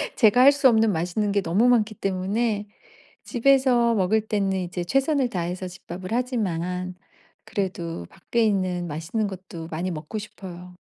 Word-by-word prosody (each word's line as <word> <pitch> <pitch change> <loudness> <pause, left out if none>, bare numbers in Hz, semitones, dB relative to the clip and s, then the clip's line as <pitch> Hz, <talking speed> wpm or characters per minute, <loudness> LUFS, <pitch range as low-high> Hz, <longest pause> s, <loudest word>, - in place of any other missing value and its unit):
제가 230 +1 +5
할 275 +2 +9
수 280 -2 +4
없는 220 -2 +4
맛있는 180 +4 -1
게 200 0 +2
너무 195 +7 +2
많기 225 -3 +3
때문에 205 +3 -1 0.6
집에서 245 -2 +3
먹을 210 +1 +2
때는 200 -3 0
이제 180 0 -4
최선을 270 - +1
다해서 180 0 -3
집밥을 180 0 -8
하지만, 185 -7 -2 0.5
그래도 170 - -4
밖에 235 -1 -1
있는 185 -4 0
맛있는 165 +8 -2
것도 180 -3 -8
많이 170 +4 -2
먹고 160 +6 -5
싶어요. 180 -4 -10
195 Hz, 315 characters per minute, -24 LUFS, 180-230 Hz, 0.6 s, 할